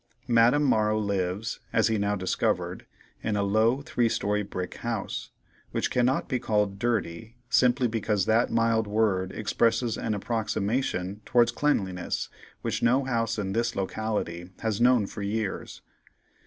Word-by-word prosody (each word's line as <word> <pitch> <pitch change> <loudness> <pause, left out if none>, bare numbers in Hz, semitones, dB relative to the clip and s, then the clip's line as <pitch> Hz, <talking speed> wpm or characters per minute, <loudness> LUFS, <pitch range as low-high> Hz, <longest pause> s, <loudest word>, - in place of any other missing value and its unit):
Madame 120 +4 +4
Morrow 110 -5 +2
lives, 100 +1 -2
as 110 - +3
he 110 -2 +1
now 100 0 +1
discovered, 95 -1 -1 0.3
in 110 -1 -1
a 100 - +1
low, 110 +7 +2
three 120 -4 +1
story 105 -1 0
brick 95 -3 -5
house, - - -4 0.4
which - - -1
cannot 125 +1 +1
be 125 - -1
called 105 -3 0
dirty, 115 -2 -2 0.2
simply 125 0 +4
because 105 -4 0
that 115 +2 +3
mild 115 -1 +2
word 105 -3 +1
expresses 115 +2 0
an 110 -2 -1
approximation 105 -2 -2
towards 120 +1 +3
cleanliness 95 -11 -1 0.3
which - - -2
no 125 +4 +3
house 115 -4 -1
in 95 -2 -2
this 115 +2 0
locality 95 -3 -3
has 110 0 -1
known 125 -3 +5
for 105 - -7
years. 100 0 -3
110 Hz, 140 wpm, -27 LUFS, 100-115 Hz, 0.4 s, known